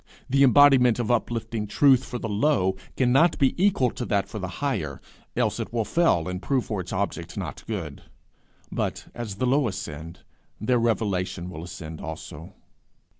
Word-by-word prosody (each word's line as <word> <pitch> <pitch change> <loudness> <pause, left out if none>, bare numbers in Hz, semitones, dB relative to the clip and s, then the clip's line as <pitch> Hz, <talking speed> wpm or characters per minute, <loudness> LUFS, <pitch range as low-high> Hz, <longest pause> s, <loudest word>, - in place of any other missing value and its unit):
The 135 +1 +2
embodiment 135 -3 +6
of 120 -1 -1
uplifting 115 -2 -1
truth 130 +4 +4
for 125 - -5
the 115 - -4
low, 105 -3 +2 0.2
cannot 135 +7 +4
be 135 -2 +3
equal 160 - +3
to 120 - -5
that 100 -2 +1
for 110 - -6
the 95 - -3
higher, 80 - -2 0.4
else - - 0
it - - -4
will 115 -2 0
fail, 165 - +2
and 90 0 -4
prove 130 +1 0
for 105 -4 -2
its 90 - -8
object 90 -3 -3
not 80 -3 -5
good; 85 -10 -5 0.7
but, - - -2
as 115 -5 -5
the 115 - -1
low 135 +1 +3
ascend, 85 -3 -6 0.4
their 120 +3 +2
revelation 95 -6 -1
will 80 -1 -7
ascend 80 -2 -8
also. 80 +2 -8
110 Hz, 170 wpm, -25 LUFS, 90-125 Hz, 0.7 s, embodiment